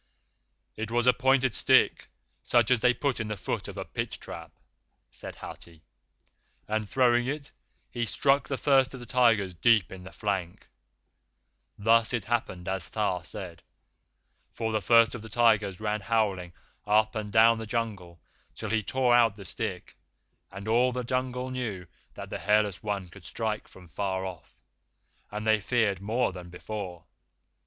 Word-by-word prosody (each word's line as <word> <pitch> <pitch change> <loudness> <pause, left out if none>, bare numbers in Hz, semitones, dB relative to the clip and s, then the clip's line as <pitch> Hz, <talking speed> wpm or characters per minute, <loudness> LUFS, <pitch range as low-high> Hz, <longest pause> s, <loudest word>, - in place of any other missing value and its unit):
"It 110 0 -4
was 120 +1 +1
a 125 - +6
pointed 130 -1 +2
stick, - - +3 0.3
such 120 - +2
as 125 - +4
they 125 +2 +4
put 135 0 -1
in 110 - -2
the 105 -1 -4
foot 90 - -3
of - - -8
a - - -4
pit - - -4
trap," - - -9 0.6
said - - -6
Hathi, 85 -2 -11 0.8
"and 110 -1 -2
throwing 120 -1 +3
it, 145 +1 -4 0.4
he 120 - -2
struck 140 +6 +2
the 135 - -2
First 135 -2 +3
of - - -9
the 120 - -9
Tigers 115 -6 +3
deep 105 0 +3
in 95 -1 -9
the 95 - -10
flank. 95 -5 -3 1.1
Thus 115 +3 +3
it 115 -4 -1
happened 110 -6 -2
as 95 -2 -2
Tha 100 -5 -1
said, 85 0 -8 0.9
for 110 -1 -3
the 110 -1 0
First 115 +4 +5
of 120 - -6
the 115 - -10
Tigers 110 -4 +2
ran 105 0 -1
howling 100 -5 0 0.3
up 110 +1 +3
and 105 -2 -4
down 115 +1 +5
the 110 - -6
Jungle 105 -7 -4 0.4
till 110 -1 -5
he 110 -1 +2
tore 125 +3 +2
out 115 -4 +5
the 100 -2 -11
stick, - - -5 0.6
and 100 +2 -8
all 120 +3 +3
the 125 0 -3
Jungle 130 +1 -2
knew 110 -8 -4 0.3
that - - -8
the - - -4
Hairless 105 -2 +1
One 100 -3 -3
could 90 +2 -15
strike 110 +2 -3
from 90 -1 -15
far 95 +2 -2
off, 90 -3 -9 0.7
and 105 +1 -5
they 110 -1 +3
feared 105 -3 +1
more 110 +3 0
than 90 -1 -9
before. 90 -2 -7
110 Hz, 165 wpm, -28 LUFS, 95-120 Hz, 1.1 s, a